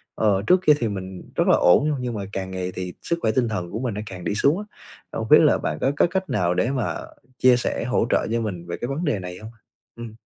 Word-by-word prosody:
Ờ, 100 Hz, -2 st, +2 dB
trước 180 Hz, 0 st, +5 dB
kia 150 Hz, -, +9 dB
thì 115 Hz, -, 0 dB
mình 95 Hz, -2 st, -6 dB
rất -, -, +1 dB
là -, -, +6 dB
ổn 145 Hz, +12 st, +4 dB
nha, 150 Hz, -, 0 dB
nhưng 125 Hz, -2 st, -3 dB
mà 100 Hz, -1 st, -4 dB
càng 95 Hz, -1 st, -4 dB
ngày 90 Hz, 0 st, -3 dB
thì 90 Hz, -1 st, -5 dB
sức 170 Hz, 0 st, -1 dB
khỏe 110 Hz, -, +2 dB
tinh 120 Hz, 0 st, +1 dB
thần 90 Hz, -5 st, -4 dB
của 110 Hz, -, -4 dB
mình 125 Hz, -5 st, -2 dB
nó 105 Hz, -, -4 dB
càng 90 Hz, -3 st, -8 dB
đi 105 Hz, -, -1 dB
xuống 145 Hz, -, +2 dB
á, 210 Hz, -, -6 dB, 0.5 s
không -, -, -4 dB
biết -, -, +9 dB
là -, -, +4 dB
bạn 75 Hz, -, -3 dB
có 135 Hz, -, +2 dB
có -, -, +4 dB
cách 190 Hz, -1 st, -2 dB
nào 90 Hz, -4 st, +1 dB
để 120 Hz, +8 st, 0 dB
mà 130 Hz, -5 st, -1 dB, 0.4 s
chia 125 Hz, -1 st, +5 dB
sẻ 120 Hz, -, -2 dB
hỗ 125 Hz, -2 st, +1 dB
trợ -, -, +1 dB
cho 115 Hz, 0 st, 0 dB
mình 90 Hz, -5 st, -5 dB
về 85 Hz, -, -4 dB
cái 120 Hz, -, -4 dB
vấn 155 Hz, +6 st, -2 dB
đề 120 Hz, -10 st, 0 dB
này 90 Hz, 0 st, -7 dB
hông? 110 Hz, +1 st, -10 dB, 0.4 s
Ừm. 115 Hz, -2 st, -8 dB
110 Hz, 280 wpm, -23 LUFS, 95-130 Hz, 0.5 s, kia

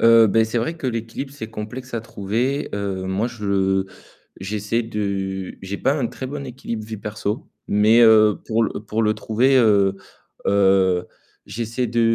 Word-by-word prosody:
Heu, 115 Hz, -1 st, +7 dB
beh 110 Hz, +3 st, +4 dB
c'est 115 Hz, +2 st, -1 dB
vrai 160 Hz, +9 st, -2 dB
que 150 Hz, -, -4 dB
l'équilibre 120 Hz, +3 st, -4 dB
c'est 140 Hz, -6 st, -7 dB
complexe 120 Hz, +4 st, -7 dB
à 115 Hz, -, -1 dB
trouver. 115 Hz, +7 st, -2 dB
Heu, 100 Hz, -2 st, -3 dB
moi 95 Hz, +5 st, -1 dB
je, 120 Hz, -3 st, -9 dB
heu, 95 Hz, -1 st, +1 dB, 0.5 s
j'essaie 105 Hz, +4 st, -1 dB
de, 100 Hz, -3 st, -3 dB
j'ai 95 Hz, +1 st, -5 dB
pas 135 Hz, -, +2 dB
un 140 Hz, -5 st, 0 dB
très 125 Hz, +2 st, -6 dB
bon 140 Hz, +1 st, -5 dB
équilibre 115 Hz, -3 st, -6 dB
vie 110 Hz, 0 st, -6 dB
perso, 105 Hz, 0 st, -4 dB, 0.2 s
mais 110 Hz, +3 st, +5 dB
heu, 110 Hz, -2 st, +6 dB
pour 115 Hz, +1 st, +1 dB
le -, -, -1 dB
pour 110 Hz, +1 st, -2 dB
le 105 Hz, 0 st, +2 dB
trouver 115 Hz, +5 st, +2 dB
heu 100 Hz, -5 st, +4 dB, 0.5 s
heu, 95 Hz, -2 st, +3 dB, 0.4 s
j'essaie 115 Hz, +3 st, -3 dB
de 120 Hz, +1 st, 0 dB
110 Hz, 175 wpm, -22 LUFS, 100-120 Hz, 0.5 s, Heu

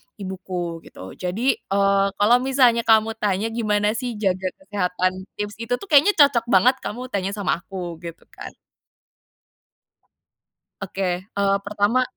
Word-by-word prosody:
ibuku 185 Hz, -3 st, -5 dB
gitu. 95 Hz, +1 st, -11 dB
Jadi, 205 Hz, +9 st, -1 dB
eee, 195 Hz, 0 st, +2 dB
kalau 220 Hz, +4 st, +4 dB
misalnya 250 Hz, -3 st, +2 dB
kamu 220 Hz, 0 st, +3 dB
tanya, 210 Hz, +2 st, -1 dB
gimana 210 Hz, -2 st, +1 dB
sih 235 Hz, +1 st, -4 dB
jaga 190 Hz, -3 st, -1 dB, 0.2 s
kesehatan? 185 Hz, -2 st, -2 dB
Tips 205 Hz, +1 st, -5 dB
itu 230 Hz, +2 st, -3 dB
tuh, 400 Hz, -, -10 dB
kayaknya 300 Hz, +8 st, +6 dB
cocok 280 Hz, -6 st, +4 dB
banget 235 Hz, +5 st, +4 dB
kamu 240 Hz, +4 st, -6 dB
tanya 195 Hz, -1 st, -2 dB
sama 195 Hz, -4 st, -1 dB
aku, 175 Hz, -4 st, -7 dB
gitu 170 Hz, -1 st, -9 dB
kan. -, -, -10 dB, 2.3 s
Oke, 195 Hz, 0 st, -6 dB, 0.2 s
eee, 200 Hz, -1 st, 0 dB
pertama, 210 Hz, +5 st, +1 dB
205 Hz, 135 wpm, -22 LUFS, 190-230 Hz, 2.3 s, kayaknya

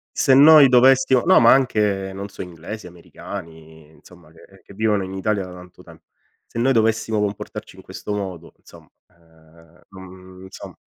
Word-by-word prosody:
se 135 Hz, -, +2 dB
noi 145 Hz, 0 st, +7 dB
dovessimo 130 Hz, +1 st, +4 dB
no, 185 Hz, -, +5 dB
ma 115 Hz, -, +5 dB
anche 105 Hz, -7 st, -1 dB
non 100 Hz, +1 st, -7 dB
so 100 Hz, -, -11 dB
inglesi, 90 Hz, +4 st, -10 dB
americani 80 Hz, -3 st, -12 dB
insomma 85 Hz, 0 st, -20 dB
che 95 Hz, +4 st, -20 dB
che -, -, -17 dB
vivono 105 Hz, -1 st, -1 dB
in 95 Hz, 0 st, -8 dB
Italia 100 Hz, 0 st, -3 dB
da 90 Hz, -, -12 dB
tanto 90 Hz, 0 st, -15 dB
tempo. 80 Hz, -2 st, -18 dB, 0.4 s
Se -, -, -12 dB
noi 130 Hz, +3 st, +1 dB
dovessimo 110 Hz, -1 st, 0 dB
comportarci 105 Hz, 0 st, -6 dB
in -, -, -15 dB
questo 105 Hz, -, -8 dB
modo 95 Hz, -5 st, -7 dB
insomma, -, -, -18 dB, 0.2 s
ehm, 80 Hz, 0 st, -25 dB
mhmm, 95 Hz, -1 st, -14 dB
insomma 95 Hz, -, -12 dB
95 Hz, 165 wpm, -20 LUFS, 85-110 Hz, 0.4 s, noi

